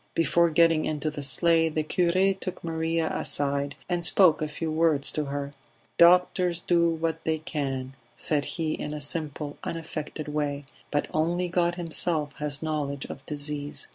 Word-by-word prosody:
Before 170 +1 +3
getting 165 0 +4
into 155 0 -2
the 150 - -6
sleigh 165 +4 +3
the 155 0 -1
cure 185 +4 +2
took 185 -1 -6
Maria 165 0 -1
aside 140 0 -1
and 175 -1 -1
spoke 170 -1 +5
a 155 - 0
few 155 +1 -4
words 155 -3 +3
to 150 - -2
her. 140 0 -4 0.5
"Doctors 180 0 +5
do 170 -1 +2
what 165 0 -2
they 160 0 0
can," 135 -5 -4 0.2
said 145 -2 0
he 160 -2 -1
in 150 - -4
a - - -5
simple 145 -1 -4
unaffected 155 -2 -5
way, 145 -1 -2 0.2
"but 145 - 0
only 170 +3 +1
God 175 0 +1
Himself 165 -3 +1
has 150 0 -1
knowledge 145 -3 -2
of 135 - -10
disease. 145 -1 -4
155 Hz, 160 wpm, -27 LUFS, 145-170 Hz, 0.5 s, spoke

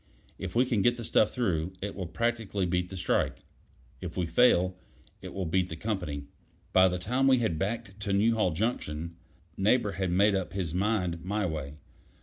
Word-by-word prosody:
If 95 +1 -5
we 125 +2 +4
can 120 -6 +1
get 120 +4 +3
the 120 - -6
stuff 110 -1 +3
through, 90 -8 -1
it 100 +1 -4
will 95 -3 -5
practically 110 0 -1
beat 90 0 0
the 95 - -7
strike. 90 - 0 0.6
If - - -6
we 90 - +1
fail, 90 -2 +4 0.5
it - - -7
will 95 -1 -3
beat 90 +2 +1
the 80 - -5
company." 85 -7 -3 0.5
By 95 0 +7
the 90 0 -1
time 125 +9 +1
we 130 -1 +6
had 110 -10 0
backed 100 -1 -3
to 100 -1 -3
Newhall 110 0 +3
Junction, 85 -4 -2 0.4
Neighbor 105 +2 +3
had 95 0 -2
made 100 +4 +4
up 95 -2 -2
his 90 -5 -2
mind 90 -3 0
my 105 +3 -1
way. 75 -4 -4
95 Hz, 185 wpm, -29 LUFS, 90-110 Hz, 0.6 s, By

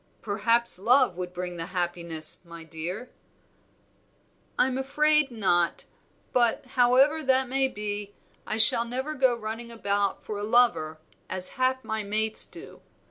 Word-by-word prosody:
"Perhaps 225 0 +3
love 250 0 +3
would 180 0 -6
bring 180 -1 -6
the 165 0 -5
happiness, 170 -3 0
my 170 -1 -12
dear?" 165 +9 -7 1.5
"I'm 260 0 +1
afraid 300 +2 +2
not; 180 -7 -1 0.5
but, 240 -1 +1
however 260 +5 +3
that 265 -2 +1
may 265 +1 0
be, 205 -3 -6 0.3
I 215 - -3
shall 225 +1 +6
never 260 +6 -4
go 260 -4 +2
running 225 +1 -7
about 200 -3 -2
for 210 -1 -6
a - - -5
lover 215 -9 +2 0.3
as 185 -1 +2
half 260 0 -1
my 220 0 -4
mates 215 +2 +1
do. - - -12
220 Hz, 135 wpm, -26 LUFS, 185-255 Hz, 1.5 s, shall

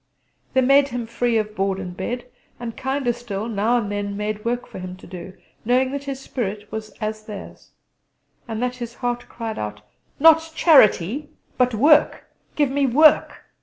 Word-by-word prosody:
They 260 - +4
made 275 +2 +5
him 245 -3 -4
free 230 0 0
of 215 -1 -2
board 195 0 0
and 180 -2 -6
bed; 240 +7 -4 0.3
and, 230 -2 -6
kinder 265 -2 -1
still, 230 -3 -5
now 225 +2 +1
and 205 -4 -2
then 200 0 -3
made 210 0 -3
work 240 +1 -2
for - - -10
him 185 0 -7
to - - -14
do, 185 +1 -9 0.3
knowing 255 +3 +2
his 275 -1 -6
spirit 210 -6 -5
was 220 0 -5
as 215 0 -4
theirs, 210 -2 -10 0.8
and 225 +1 -3
that 250 0 -2
his 240 -1 -7
heart 245 -1 -3
cried 225 -2 -5
out: 105 0 -5 0.4
"Not 320 +1 +5
charity, 280 - +4 0.3
but 250 -2 +2
work! 295 +6 +4 0.3
Give 290 -3 +2
me 280 0 +2
work!" 300 +5 +4
235 Hz, 170 wpm, -22 LUFS, 210-260 Hz, 0.8 s, made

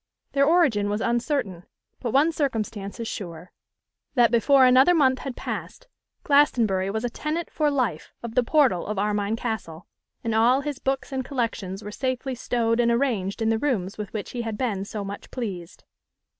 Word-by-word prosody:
Their 280 0 +3
origin 280 -12 +3
was 205 +1 -1
uncertain; 235 - -1 0.4
but 245 - -3
one 290 +6 +4
circumstance 225 -9 -3
is 230 - -3
sure: 175 -4 -7 0.6
that, 240 -3 +5
before 260 +3 +5
another 260 +7 +6
month 260 -4 +3
had 270 -3 -5
passed, - - -6 0.4
Glastonbury 230 -10 +3
was 220 +3 -2
a - - 0
tenant 310 +6 -3
for 300 -2 +1
life 250 - -1
of 235 -1 -5
the 250 - +4
portal 250 - +2
of 210 -1 -3
Armine 205 +1 0
Castle, 220 -8 -5 0.4
and 225 -2 -1
all 240 +5 +4
his 285 -1 -4
books 270 +1 -2
and 265 -1 -2
collections 225 -7 -3
were 210 - -6
safely 260 +2 -2
stowed 235 -1 0
and 235 -1 +3
arranged 230 -5 0
in 220 - +2
the 225 0 +1
rooms 215 -9 -1
with 210 - -5
which 215 -2 -5
he 245 - -3
had 225 -2 -4
been 205 -6 -1
so 205 0 -5
much 200 +1 -7
pleased. 190 -8 -6
235 Hz, 180 wpm, -25 LUFS, 205-265 Hz, 0.6 s, another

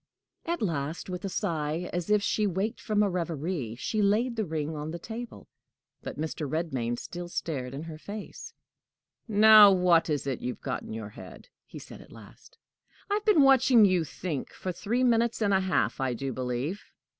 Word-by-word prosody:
At 340 -6 -1
last, 160 0 -3
with 180 +2 -5
a - - -2
sigh, 160 0 -2
as 175 +2 -3
if 210 -1 +3
she 210 0 +1
waked 195 +4 -2
from 210 -1 +1
a - - +2
reverie, 165 -7 -3
she 215 - -2
laid 220 +5 +2
the 220 -2 -1
ring 155 0 -3
on 150 +1 -5
the 170 - -5
table. 230 +7 -8 0.5
But - - -7
Mr. 155 -2 -3
Redmain 130 -7 -2
still 175 +5 -7
stared 135 -7 -4
in 145 - -6
her 160 -2 -8
face. 205 +4 -8 0.8
"Now 215 -1 +8
what 175 -3 +3
is 145 -2 -1
it 135 -3 -3
you've 125 0 -5
got - - -3
in - - -10
your 110 -1 -6
head?" 115 - -12 0.2
he - - -10
said - - -11
at - - -17
last. - - -16 0.5
"I - - +3
have 415 0 -1
been 410 -10 +5
watching 260 -4 +6
you 185 -3 +2
think 155 0 -5
for 185 - -4
three 230 +8 -1
minutes 235 -1 +2
and 205 -3 +2
a 190 - +4
half, 190 -5 0
I 130 -2 0
do 135 +2 -4
believe. 130 - -3
175 Hz, 190 wpm, -28 LUFS, 150-210 Hz, 0.8 s, Now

